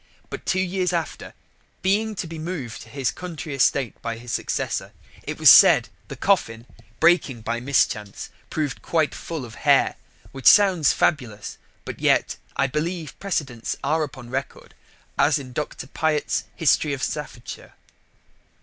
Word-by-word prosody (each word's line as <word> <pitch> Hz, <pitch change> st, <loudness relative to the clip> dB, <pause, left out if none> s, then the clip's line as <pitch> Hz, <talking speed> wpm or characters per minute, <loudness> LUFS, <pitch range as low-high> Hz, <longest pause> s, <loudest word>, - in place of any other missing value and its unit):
But -, -, -7 dB
two 185 Hz, -, +1 dB
years 185 Hz, 0 st, -1 dB
after, 165 Hz, -2 st, -4 dB, 0.5 s
being 210 Hz, +3 st, +1 dB
to 190 Hz, -, -4 dB
be 165 Hz, -1 st, -7 dB
moved 155 Hz, -8 st, -5 dB
to -, -, -13 dB
his 135 Hz, -3 st, -1 dB
country 165 Hz, -4 st, -7 dB
estate 135 Hz, -2 st, +1 dB
by 115 Hz, -1 st, -4 dB
his 120 Hz, +1 st, -8 dB
successor, -, -, -2 dB, 0.3 s
it -, -, -6 dB
was -, -, +9 dB
said -, -, +7 dB, 0.2 s
the -, -, -7 dB
coffin, 115 Hz, -, 0 dB, 0.3 s
breaking 160 Hz, -8 st, +3 dB
by 115 Hz, +2 st, -2 dB
mischance, 115 Hz, -6 st, -1 dB, 0.2 s
proved 150 Hz, -4 st, -3 dB
quite 160 Hz, -3 st, 0 dB
full 160 Hz, -6 st, -6 dB
of 115 Hz, -, -12 dB
Hair: -, -, +3 dB, 0.3 s
which 135 Hz, -2 st, -2 dB
sounds 190 Hz, -7 st, +6 dB
fabulous, 120 Hz, -10 st, -1 dB, 0.3 s
but -, -, -7 dB
yet -, -, +2 dB, 0.2 s
I -, -, +2 dB
believe 155 Hz, +3 st, -3 dB
precedents 145 Hz, -, -3 dB
are 155 Hz, +3 st, +1 dB
upon 130 Hz, -5 st, -6 dB
record, 135 Hz, +2 st, -5 dB, 0.5 s
as 150 Hz, +1 st, +4 dB
in 130 Hz, -3 st, -8 dB
Dr. 150 Hz, -1 st, -4 dB
Plot's 155 Hz, +2 st, -1 dB
History 150 Hz, -1 st, +2 dB
of 135 Hz, -, -4 dB
Staffordshire. 140 Hz, -5 st, -6 dB
150 Hz, 150 wpm, -23 LUFS, 125-170 Hz, 0.5 s, was